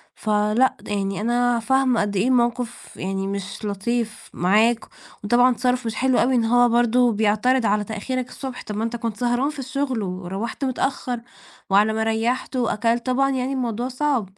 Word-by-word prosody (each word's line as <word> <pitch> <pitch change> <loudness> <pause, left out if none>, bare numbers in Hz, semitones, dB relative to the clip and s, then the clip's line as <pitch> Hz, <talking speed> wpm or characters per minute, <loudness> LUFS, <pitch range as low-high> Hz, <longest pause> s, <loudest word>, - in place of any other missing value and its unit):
ف 215 - -6
لأ 210 +5 +2
يعني 195 -1 -2
أنا 240 +1 +1
فاهمة 265 0 +2
قد 205 -1 -2
إيه 210 +7 +2
موقف 240 -1 -1
يعني 195 +1 -3
مش 200 +2 -5
لطيف 215 +2 -3
معاك، 220 +6 +2 0.4
وطبعًا 245 +4 +4
تصِرُّف 250 0 0
مش 225 - -3
حلو 260 -1 +2
أوي 255 +1 +3
إن 230 -2 +2
هو 245 +1 +4
برضه 240 +1 +3
بيعترض 220 +4 +2
على 210 0 +2
تأخيرك 245 +4 -4
الصبح، 260 -2 -7
طَب 210 - -6
ما 220 - -2
أنت 230 +1 -2
كنت 230 -2 -4
سهران 245 +3 +1
في 300 -2 -8
الشغل، 265 -2 -2
وروّحت 190 +8 -4
متأخّر 255 -1 -2 0.5
وعلى 210 +3 +4
ما 220 0 0
ريّحت 225 +4 -1
وأكلت، 235 0 0
طبعًا 270 +2 +2
يعني 260 0 -1
الموضوع 240 -2 -2
صعب. 255 -8 -1
235 Hz, 170 wpm, -22 LUFS, 210-255 Hz, 0.5 s, وطبعًا